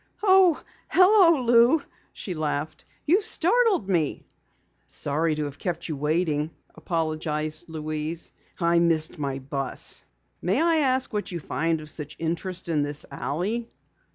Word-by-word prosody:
"Oh, 375 -5 +5 0.3
hello, 365 -7 +5
Lou," 240 +5 +4 0.3
she 185 - -6
laughed. 155 0 -3 0.2
"You 365 +8 +4
startled 435 - +3
me." 165 -7 -1 0.6
"Sorry 155 +2 0
to 150 0 -2
have 145 -1 -8
kept 175 -3 -3
you 155 - -3
waiting," 150 +1 0 0.2
apologized 155 -1 -3
Louise. 155 +1 -3 0.3
"I 170 -1 +3
missed 160 -2 +2
my 140 -2 -2
bus. 135 0 -2 0.4
May 190 +8 +1
I 330 0 +3
ask 260 -4 +2
what 210 -2 -3
you 175 - -4
find 165 +1 -1
of 155 - -9
such 150 -1 -7
interest 170 +3 -3
in 160 -3 +1
this 145 0 0
alley?" 210 +11 -3
165 Hz, 135 wpm, -25 LUFS, 155-235 Hz, 0.6 s, Oh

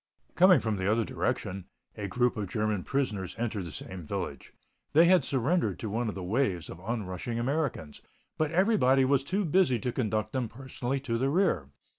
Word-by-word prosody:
Coming 180 -3 +6
from 110 -3 -1
the 95 +2 +1
other 115 0 +2
direction, 90 +1 -2 0.3
a 105 -2 -4
group 125 +5 +1
of 105 -3 -3
German 105 0 -1
prisoners 105 -10 -2
entered 110 -5 -2
the 85 - -7
same 95 +5 -6
village. 85 -6 -5 0.4
They 160 +3 +7
had 180 -3 +5
surrendered 130 - +1
to 110 - -5
one 115 +1 -1
of - - -5
the 95 - -5
waves 95 -3 -1
of 80 - -9
onrushing 105 +1 -4
Americans, 125 - -2 0.3
but 155 -1 0
everybody 150 - +3
was 135 0 +2
too 190 +7 -1
busy 165 -6 +3
to 125 +2 -2
conduct 110 -3 -1
them 125 -4 -1
personally 130 +1 -4
to 115 -4 -2
the 135 +2 +1
rear. 155 - +1
120 Hz, 185 wpm, -29 LUFS, 100-140 Hz, 0.4 s, They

